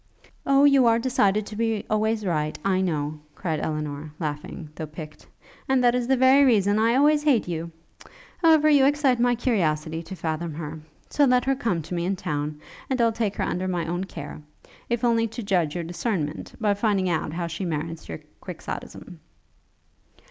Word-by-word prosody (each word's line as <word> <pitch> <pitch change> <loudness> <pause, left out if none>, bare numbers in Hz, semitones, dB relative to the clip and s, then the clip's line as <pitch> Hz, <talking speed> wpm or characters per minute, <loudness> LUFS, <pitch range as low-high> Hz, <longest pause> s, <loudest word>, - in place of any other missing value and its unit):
'Oh, 275 0 +5
you 275 -4 +6
are 230 0 +5
decided 215 -4 +1
to 210 - -8
be 225 -1 -1
always 215 0 0
right, 155 -4 -1
I 190 -1 +2
know!' 155 -4 -2 0.2
cried 160 -5 -2
Elinor, 150 -1 -4
laughing, 150 0 -5
though 155 0 -6
piqued; 155 0 -10 0.4
'and 265 -1 +3
that 240 -1 +5
is 245 -1 -1
the 265 0 +3
very 260 +2 +6
reason 210 -5 +3
I 230 +2 +3
always 295 +2 +4
hate 280 -10 +2
you! 170 -1 -4 0.7
However, 320 -2 +5
you 290 -3 +5
excite 280 -4 +2
my 245 0 +3
curiosity 165 -9 0
to 190 +3 -8
fathom 160 -2 -3
her; 155 0 -6 0.3
so 290 - +4
let 250 -1 +3
her 270 - +3
come 195 - -1
to 165 - -7
me 170 -1 -1
in 195 +2 0
town, 150 -3 -3 0.3
and 260 -1 0
I'll 230 -1 +4
take 220 -3 -2
her - - -2
under 185 +1 -2
my 175 -3 -1
own 175 +3 -2
care, 155 -5 -8 0.5
if 235 0 -1
only 230 -1 +3
to 225 +1 -7
judge 180 -6 0
your 175 - -2
discernment, 170 -3 -3
by 210 -3 +2
finding 200 -2 +1
out 160 -3 -1
how 170 0 -2
she 170 +3 -5
merits 165 -1 -4
your 80 - -6 0.2
quixotism.' - - -8
195 Hz, 185 wpm, -25 LUFS, 160-240 Hz, 0.7 s, you